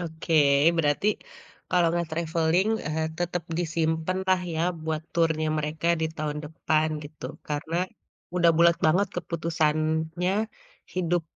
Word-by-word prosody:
oke, 165 -1 -5 0.4
berarti, 150 +4 +1 0.6
kalau 180 -2 +3
gak 170 - -1
travelling 165 +3 +1 0.2
eee, 155 +1 -1
tetep 175 -1 -1 0.2
disimpenlah 170 +3 0
ya 160 - -1 0.2
buat 160 -1 -2
turnya 160 -2 +2
mereka 150 +2 -3
di 160 - +2
tahun 150 -1 -2
depan 155 0 0 0.2
gitu. 150 +1 -11 0.2
Karena, 150 +3 -2 0.6
udah 170 -2 +5
bulat 170 0 +5
banget 185 +5 +3
keputusannya, 160 +1 0 0.6
hidup 175 -1 +1
160 Hz, 115 wpm, -26 LUFS, 155-175 Hz, 0.6 s, udah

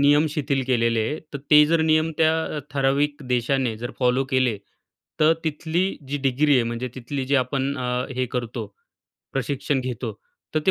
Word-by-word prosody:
नियम 145 +2 +5
शिथिल 140 -2 -1
केलेले 115 -2 +2
आहे. 155 - -3
तर 140 - -4
ते 150 0 +9
जर 165 +1 +2
नियम 160 0 +3
त्या 160 -1 +2
ठराविक 145 +2 +1
देशाने 125 -1 +1
जर 120 +2 -5
फॉलो 125 +1 +2
केले, 130 -4 +2 0.6
तर 155 +1 +6
तिथली 160 +3 0 0.2
जी 145 - -1
डिग्री 140 +2 +2
आहे 125 - +4
म्हणजे 120 +2 -3
तिथली 130 +2 -4
जी 140 - +1
आपण 140 +2 -2
अ, 125 0 -1
हे 130 0 0
करतो 120 -2 -3 0.7
प्रशिक्षण 135 +1 -1
घेतो, 125 -2 -4 0.4
तर 155 - +2
ते - - +6
135 Hz, 170 wpm, -24 LUFS, 125-150 Hz, 0.7 s, ते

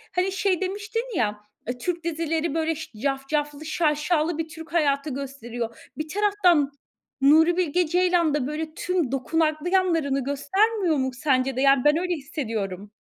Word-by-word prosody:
hani, 365 +2 +1
şey 380 -1 0
demiştin 410 +4 -2
ya, 210 -2 0 0.3
eee, 245 +1 -3
Türk 340 +6 -3
dizileri 325 -1 -1
böyle, 325 0 0 0.3
cafcaflı 285 +2 -2
şaşalı 310 +1 +1
bir 325 0 -2
Türk 325 +1 -10
hayatı 290 -3 +2
gösteriyor. 245 -4 -5 0.2
Bir 305 +1 -3
taraftan, 370 -7 +3 0.5
Nuri 320 +5 +5
Bilge 355 -1 +1
Ceylan 350 -2 +2
da 285 -4 0
böyle 310 +1 -4
tüm 355 -8 -1
dokunaklı 310 +4 0
yanlarını 330 -8 +1
göstermiyor 350 - +1
mu 260 -1 0
sence 260 0 +1
de? 260 - -1
Yani, 275 -2 +5
ben 295 +1 +5
öyle 360 +1 -1
hissediyorum. 220 - -4
310 Hz, 145 wpm, -25 LUFS, 275-350 Hz, 0.5 s, Nuri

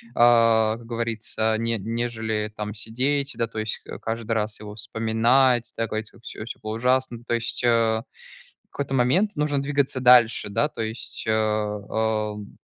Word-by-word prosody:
а, 115 -2 +5
как 115 - -14
говорится, 115 -1 -1
не 115 0 0
нежели 110 0 -2
там 105 -1 -4
сидеть, 130 +6 -1
да, 115 - 0
то 110 -1 -6
есть 110 0 -3
ка - - -9
каждый 115 0 -4
раз 105 -1 -1
его 105 0 -8
вспоминать, 115 +3 +2
такой 110 -1 -2
типа: 110 - -18
"Всё 110 - -8
всё 115 - -8
было 110 0 -3
ужасно". 125 -1 +1
То 120 - -2
есть, 115 +1 -3
а, 115 -1 +2 0.6
в - - -62
какой-то 140 -1 -4
момент 175 +13 +2
нужно 145 -2 0
двигаться 140 -2 0
дальше, 125 -4 +5
да, 145 +9 +2
то 115 - -7
есть, 110 +2 -5
а 105 0 -1
115 Hz, 160 wpm, -24 LUFS, 110-125 Hz, 0.6 s, а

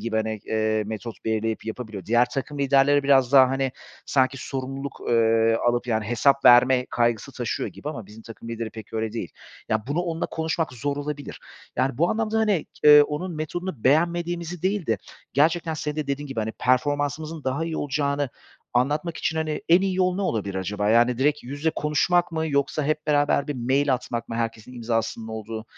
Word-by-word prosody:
gibi, 115 -1 -2
hani, 110 -1 -2
eee, 110 -1 0
metot 110 +1 -7
belirleyip 110 0 -1
yapabiliyor. 110 -5 -6
Diğer 120 +2 +4
takım 140 +2 -4
liderleri 140 +1 +4
biraz 135 -2 +4
daha, 130 -2 +8
hani, 135 -1 -1 0.3
sanki 135 0 +2
sorumluluk, 135 +1 -5
eee, 115 -1 +3
alıp, 120 +1 +1
yani, 110 -2 0
hesap 135 +4 +2
verme 125 +1 +6
kaygısı 120 -3 0
taşıyor - - -3
gibi 145 - -8
ama 115 -10 -6
bizim 110 +2 -13
takım 115 0 -11
lideri 115 -1 -4
pek 110 -1 -11
öyle 110 -1 -2
değil. 95 -8 -5 0.4
Ya, 110 +1 -1
bunu 145 +5 0
onunla 170 -2 -2
konuşmak 160 -2 -2
zor 140 +3 -3
olabilir. 145 0 -5 0.4
Yani, 130 0 0
bu 170 - +3
anlamda, 220 0 0
hani, 210 -7 +1 0.2
eee, 150 0 +10
onun 155 +4 -4
metodunu 155 -3 -5
beğenmediğimizi 170 +3 +1
değil 195 -1 0
de 110 -4 +1 0.3
gerçekten 160 +3 +2
senin 150 0 -4
de 150 -2 -2
dediğin 140 +1 -3
gibi, 135 -5 -3
hani, 110 +1 -3
performansımızın 145 +5 -1
daha 135 +5 -1
iyi 165 -1 -3
olacağını 140 -1 -1 0.4
anlatmak 150 +7 0
için, 160 - -2
hani, 155 -1 -2
en 175 +2 +6
iyi 190 -1 0
yol 185 -1 +2
ne 200 - -2
olabilir 100 - -2
acaba? 105 +2 -2
Yani, 120 +2 +4
direkt 150 +2 +1
yüz 145 +3 -7
ile 160 - +3
konuşmak 170 +4 +1
mı 160 0 -1
yoksa 140 0 0
hep 155 +1 -1
beraber 145 -1 +2
bir 145 - -2
mail 130 +3 +1
atmak 120 -2 -5
mı, 115 - -5
herkesin 115 +1 -4
imzasının 115 -1 -2
olduğu, 110 0 -6
135 Hz, 185 wpm, -24 LUFS, 115-155 Hz, 0.4 s, eee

